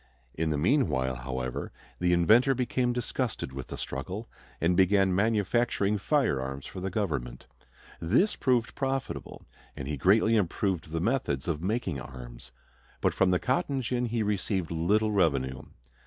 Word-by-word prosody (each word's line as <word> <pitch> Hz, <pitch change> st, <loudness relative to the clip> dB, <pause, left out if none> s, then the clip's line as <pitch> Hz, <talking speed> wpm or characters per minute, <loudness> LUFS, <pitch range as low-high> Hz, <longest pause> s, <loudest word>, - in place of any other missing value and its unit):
In 80 Hz, 0 st, -1 dB
the 75 Hz, -, 0 dB
meanwhile, 75 Hz, -, +2 dB
however, 65 Hz, 0 st, -4 dB, 0.3 s
the 90 Hz, 0 st, +2 dB
inventor 110 Hz, +10 st, +5 dB
became 125 Hz, 0 st, 0 dB
disgusted 120 Hz, -, -2 dB
with 65 Hz, -1 st, -6 dB
the -, -, -7 dB
struggle 95 Hz, -, -5 dB, 0.3 s
and 85 Hz, +2 st, +2 dB
began 95 Hz, +1 st, +4 dB
manufacturing 105 Hz, 0 st, +1 dB
firearms 70 Hz, -, 0 dB
for 95 Hz, -, -7 dB
the 95 Hz, +1 st, -2 dB
government. 70 Hz, -, -3 dB, 0.5 s
This 120 Hz, -, +2 dB
proved 125 Hz, -3 st, +1 dB
profitable, 135 Hz, -1 st, -3 dB, 0.3 s
and 65 Hz, -, -5 dB
he 75 Hz, 0 st, -2 dB
greatly 105 Hz, +9 st, +4 dB
improved 95 Hz, -3 st, 0 dB
the 80 Hz, 0 st, -1 dB
methods 95 Hz, -, 0 dB
of 80 Hz, -3 st, -1 dB
making 95 Hz, -, -2 dB
arms. -, -, -10 dB, 0.5 s
But -, -, +1 dB
from 95 Hz, -, +3 dB
the 90 Hz, -, +3 dB
cotton 135 Hz, -, 0 dB
gin 125 Hz, 0 st, -1 dB
he 115 Hz, -1 st, -1 dB
received 100 Hz, -4 st, -1 dB
little 105 Hz, +7 st, +2 dB
revenue. 70 Hz, -9 st, +1 dB
95 Hz, 145 wpm, -28 LUFS, 75-115 Hz, 0.5 s, inventor